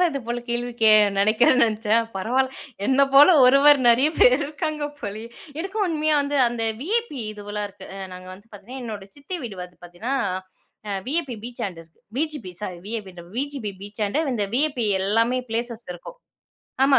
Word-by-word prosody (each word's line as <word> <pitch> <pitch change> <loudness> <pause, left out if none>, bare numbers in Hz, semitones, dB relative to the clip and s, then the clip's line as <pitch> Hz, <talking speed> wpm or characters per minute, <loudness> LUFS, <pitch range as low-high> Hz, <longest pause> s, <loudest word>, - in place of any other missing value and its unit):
தான் 355 -2 +4
இது 275 - -3
போல 240 0 -1
கேள்வி 240 +1 -2
கே 220 - +7 0.3
நெனைக்கிறேன் 220 +5 +4
நென்ச்சேன், 220 0 +1
பரவால்ல 260 +7 0 0.3
என்ன 265 +1 +3
போல 285 +2 +9 0.2
ஒருவர் 275 +3 +7
நெறைய 245 +5 +5
பேரு 250 +1 +6
இருக்காங்க 300 0 -3
போலயே! 215 +3 -6 0.3
எனக்கும் 390 +5 -1
உண்மையா 310 -2 +1
வந்து 285 0 -1
அந்த 235 -1 -3 0.2
வி.ஐ.பி 415 - -1
இதுவெலாம் 205 0 -5
இருக்கு. 195 -1 -13
அ - - -7
நாங்க 185 0 -10
வந்து 200 +4 -18
பாத்தீங்கன்னா, 210 +6 -9
என்னோட 210 -4 -6
சித்தி 285 +6 -5
வீடு 220 -6 -6
வந்து 180 0 -12
பாத்தீங்கன்னா, 175 +10 -4 0.7
அ - - -2 0.2
வி.ஐ.பி 285 -5 -2
பீச்சாண்ட 200 -8 -5
இருக்கு. 165 0 -28 0.2
வி.ஜி.பி 300 - -2
சாரி 180 -4 -6
விஐபின்றேன் 190 -6 -7
பா - - -16
வி.ஜி.பி 275 -7 -3
பீச்சாண்ட, 205 +7 -2
இந்த 210 -3 -1
வி.ஐ.பி 270 -4 0 0.2
எல்லாமே 230 +5 +2
ப்ளேசஸ் 235 0 -3
இருக்கும். 180 - -11 0.7
ஆமா 270 -1 +5
235 Hz, 165 wpm, -23 LUFS, 205-280 Hz, 0.7 s, போல